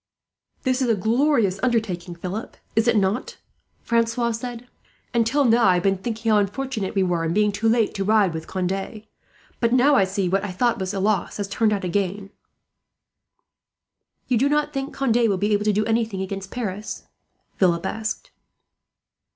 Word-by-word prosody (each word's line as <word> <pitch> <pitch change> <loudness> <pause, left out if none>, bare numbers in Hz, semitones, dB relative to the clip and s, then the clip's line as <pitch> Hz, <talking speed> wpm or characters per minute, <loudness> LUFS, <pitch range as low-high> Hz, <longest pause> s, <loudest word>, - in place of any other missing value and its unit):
"This 260 0 +1
is 250 - +1
a 225 - +4
glorious 225 -1 +2
undertaking, 195 -8 -1
Philip, 185 +5 -6 0.2
is 225 +2 +2
it 235 -2 +4
not?" 200 +5 -1 0.5
Francois 235 0 +1
said. 240 +1 -6 0.5
"Until 245 +5 +2
now 235 0 +4
I 185 -1 +5
have 175 - 0
been 195 -1 +2
thinking 225 +2 -2
how 210 - +5
unfortunate 205 0 -2
we 195 - +3
were, 175 -2 0
in 165 0 -1
being 210 0 +3
too 215 +3 0
late 225 -2 +2
to 195 - -2
ride 205 -3 +3
with 160 0 -6
Conde. 195 +3 -3 0.6
Now 250 +4 +4
I 195 - +4
see 195 +1 -2
that - - -3
what 195 +1 +1
I 205 - -3
thought 235 +5 +1
was 190 +1 -3
a - - -1
loss 205 +1 0
has 205 -1 -3
turned 215 +2 +1
out 200 -2 -1
a - - -1
gain." 195 +2 -2 2.0
"You 245 -3 +2
do 275 +3 +3
not 300 0 0
think 275 +1 -3
Conde 235 -4 +2
will 195 - +1
be 205 +3 +1
able 205 0 +1
to 215 - +4
do 210 +1 +1
anything 225 -4 0
against 195 0 -6
Paris?" 210 -3 -5 0.5
Philip 170 -3 +2
asked. 220 -1 -4
215 Hz, 185 wpm, -23 LUFS, 195-235 Hz, 2.0 s, I